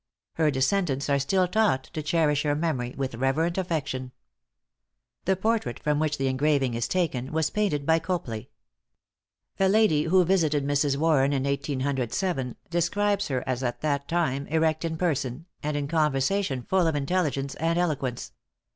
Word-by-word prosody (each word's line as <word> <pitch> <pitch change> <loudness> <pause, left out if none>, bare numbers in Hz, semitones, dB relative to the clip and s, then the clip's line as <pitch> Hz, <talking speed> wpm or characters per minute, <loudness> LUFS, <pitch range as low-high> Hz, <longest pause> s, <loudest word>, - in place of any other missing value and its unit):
Her 160 -2 +2
descendants 140 0 0
are 140 - +3
still 185 +7 +2
taught 200 -9 +2
to 155 - -3
cherish 150 -1 +2
her 145 -1 +1
memory 140 -6 -2
with 135 -2 -2
reverent 135 +8 0
affection. 140 -8 -3 1.1
The 190 - +3
portrait 210 - -1
from 150 -1 0
which 155 -1 0
the 135 - -1
engraving 135 -1 +1
is 115 0 -1
taken, 140 -8 -1
was 160 -1 0
painted 180 -10 0
by 160 +1 +4
Copley. 160 - -4 1.1
A 190 0 +4
lady 195 -8 +3
who 180 +2 +4
visited 155 -6 +2
Mrs. 145 -1 +1
Warren 145 -3 +3
in 135 -1 0
1807, 140 - -1 0.2
describes 200 +4 +1
her 130 -3 -2
as 130 -1 -1
at 120 -2 -3
that 140 -2 -1
time 155 -5 0
erect 160 0 +1
in 165 -1 -2
person, 145 -4 -1 0.2
and 150 0 -2
in 145 -1 -2
conversation 150 0 0
full 185 +2 +2
of 160 - 0
intelligence 140 -3 -1
and 165 +2 0
eloquence. 140 - -1
150 Hz, 155 wpm, -26 LUFS, 135-170 Hz, 1.1 s, by